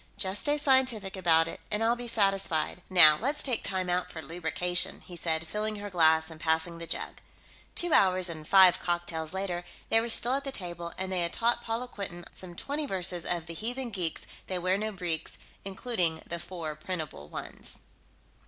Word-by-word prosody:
Just 190 +1 0
stay 290 0 +2
scientific 260 -9 +1
about 165 -3 +3
it - - -7
and 210 +1 0
I'll 230 +1 +3
be 245 0 -7
satisfied. 195 -6 +1
Now, 155 -5 +8
let's 285 +4 0
take 250 -4 +1
time 185 -1 -1
out 180 0 -1
for 160 - -7
lubrication," 175 +2 0
he 180 - -10
said, 160 -1 0
filling 215 +4 -3
her 205 0 -7
glass 160 -2 +3
and 160 - -11
passing 160 +1 0
the 170 - -5
jug. - - -4 0.6
Two 350 -2 +2
hours 185 -1 +4
and 155 -3 -7
five 185 -2 +6
cocktails 170 -2 -3
later, 185 -2 -3 0.3
they 225 - +4
were 235 - -3
still 240 +2 +6
at 275 +1 -1
the 275 - -4
table, 175 -6 -4
and 190 0 -3
they 185 -2 0
had 170 0 -1
taught 235 +1 +1
Paula 235 +2 -3
Quinton 185 -6 -7
some 180 -2 -8
twenty 290 - -4
verses 180 -4 -1
of 170 -2 0
The 170 - -7
Heathen 240 +6 -3
Geeks, 180 -5 -3 0.2
They 185 - -2
Wear 185 +1 +1
No 215 +2 -2
Breeks, 175 -5 -4 0.3
including 190 -5 -1
the 170 - -5
four 170 -4 -5
printable 155 - -6
ones. - - 0
185 Hz, 190 wpm, -29 LUFS, 170-215 Hz, 0.6 s, Now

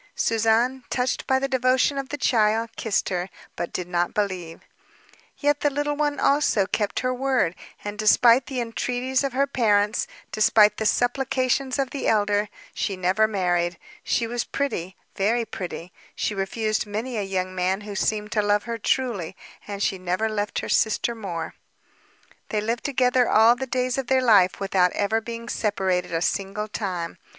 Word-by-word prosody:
Suzanne, 230 +3 +1
touched 250 0 -1
by 265 - +3
the 270 +1 -1
devotion 260 +2 +2
of 270 -1 -5
the 290 - -4
child, 225 -3 +2
kissed 220 -3 -1
her, 180 0 -2 0.3
but 175 - -4
did 180 - -4
not 175 -1 -1
believe. 185 -5 -3 0.8
Yet 290 0 +1
the 290 - +2
little 290 +1 -1
one, 290 -1 -1
also, 275 -8 +3
kept 205 0 -1
her 255 0 0
word, 255 -9 +1 0.3
and 205 0 -6
despite 235 +3 +5
the 260 -3 -2
entreaties 250 +3 -1
of 275 -2 -2
her 275 +2 +2
parents, 210 -5 +1 0.2
despite 215 0 +4
the 220 - 0
supplications 255 +2 0
of 270 -2 -1
the 280 - -3
elder, 205 -1 +2 0.2
she 195 - -2
never 185 +4 +2
married. 175 -4 0 0.3
She 235 - 0
was 240 +1 -2
pretty, 190 -10 -3 0.2
very 230 +4 +1
pretty; 180 -3 -7 0.2
she - - -1
refused 215 +2 -1
many 225 +5 -4
a - - 0
young 185 -1 -2
man 185 +2 0
who 205 0 -7
seemed 210 +2 -1
to 215 - +2
love 205 0 +2
her 230 -1 -5
truly; 215 -8 -1 0.3
and 200 -1 -4
she 190 - 0
never 185 +4 -1
left 210 -1 -2
her - - -6
sister 220 +2 +1
more. 185 -8 -5 1.0
They 215 - 0
lived 230 +3 -2
together 250 -3 +2
all 225 +2 +6
the 265 +1 -5
days 255 +1 -1
of 265 - -4
their 260 -1 +3
life, 200 -6 +5
without 190 -2 +2
ever 220 +2 0
being 230 +1 -7
separated 190 -6 -1
a 165 0 0
single 200 +3 -2
time. 185 -6 -4
220 Hz, 170 wpm, -24 LUFS, 195-255 Hz, 1.0 s, all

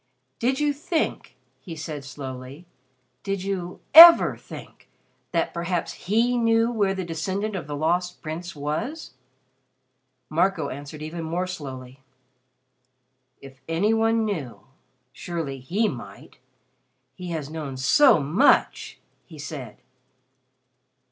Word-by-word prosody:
"Did 260 +3 0
you 295 -1 +1
think 320 +3 -3
" - - -44
he 170 -4 -9
said 155 -2 -6
slowly 130 +2 -9 0.6
"did 195 -1 -3
you 185 -3 -4
ever 335 +2 +10
think - - -13 0.4
that - - -1
perhaps 170 0 -3
he 235 +5 0
knew 230 0 +2
where 200 -4 0
the 190 -1 -4
descendant 190 +6 -3
of 170 -6 -5
the 145 - -5
Lost 175 +4 -1
Prince 165 +2 -7
was?" 155 - -4 1.2
Marco 160 -1 0
answered 145 +3 -8
even 165 +2 -6
more 170 +3 -2
slowly. 135 -7 -8 1.4
"If 135 -1 -14
any 175 +7 +1
one 225 0 +2
knew 160 - -5 0.5
surely 160 -6 -5
he 195 - 0
might. - - -9 0.7
He 180 -1 -9
has 155 -3 -5
known 150 -5 -6
so 245 - +5
much," 160 - +2 0.3
he 160 - -13
said. 140 -6 -8
170 Hz, 120 wpm, -24 LUFS, 145-215 Hz, 1.4 s, ever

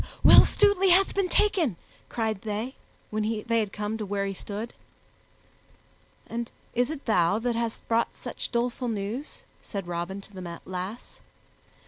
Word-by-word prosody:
"Will - - +11
Stutely 405 -2 +4
hath 380 +2 +5
been 390 -2 +1
taken," 345 - +2 0.3
cried 220 -4 -1
they, 220 +4 -3 0.4
when 215 0 0 0.2
they 230 0 +2
had 210 -3 -1
come 210 +2 -3
to 215 - -2
where 200 0 -1
he 195 - -2
stood. 210 +4 -6 1.5
"And 235 0 -4 0.2
is 245 +2 +2
it 310 -3 -6
thou 180 -3 +3
that 235 +1 -1
hast 230 -1 -3
brought 230 0 +1
such - - -5
doleful 245 +1 -1
news?" 225 +6 -4 0.2
said 200 -3 -5
Robin 175 +3 -3
to 205 - -15
the 175 -3 -7
lass. 185 +5 -6
225 Hz, 150 wpm, -27 LUFS, 200-245 Hz, 1.5 s, Will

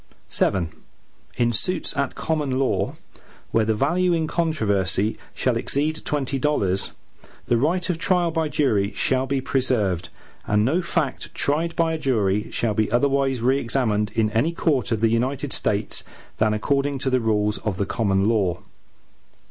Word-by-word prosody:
VII 90 -4 +1 0.7
In 120 -1 +2
suits 165 +10 -1
at 140 -2 -1
common 150 -5 -1
law, 135 0 0 0.6
where 115 -1 +2
the 110 0 +1
value 175 +9 +2
in 165 -1 +1
controversy 110 - +1 0.2
shall - - +1
exceed 155 +3 -1
twenty 140 -2 -1
dollars, 100 -11 0 0.5
the 120 - +2
right 165 +9 +1
of 175 -3 -1
trial 175 -2 +2
by 160 -1 -1
jury 110 -10 +1
shall 130 +5 +1
be 135 0 0
preserved, 105 -11 0 0.4
and 105 0 +2
no 160 +9 +2
fact 165 -6 -2
tried 160 +4 0
by 165 -1 +1
a 160 - -3
jury 105 -7 0
shall 115 -3 0
be 110 0 0
otherwise 135 0 +2
re 130 +3 +3
examined 115 -5 0
in 110 -1 +2
any 125 +10 +1
court 140 - 0
of 110 -2 0
the 115 - +4
United 130 +4 -1
States, 105 0 0 0.3
than 110 0 +2
according 140 +5 0
to 130 0 -2
the 130 - +3
rules 105 -2 +1
of 100 -4 -3
the 100 - 0
common 95 -1 +1
law. 100 -4 +1
130 Hz, 160 wpm, -23 LUFS, 105-150 Hz, 0.7 s, the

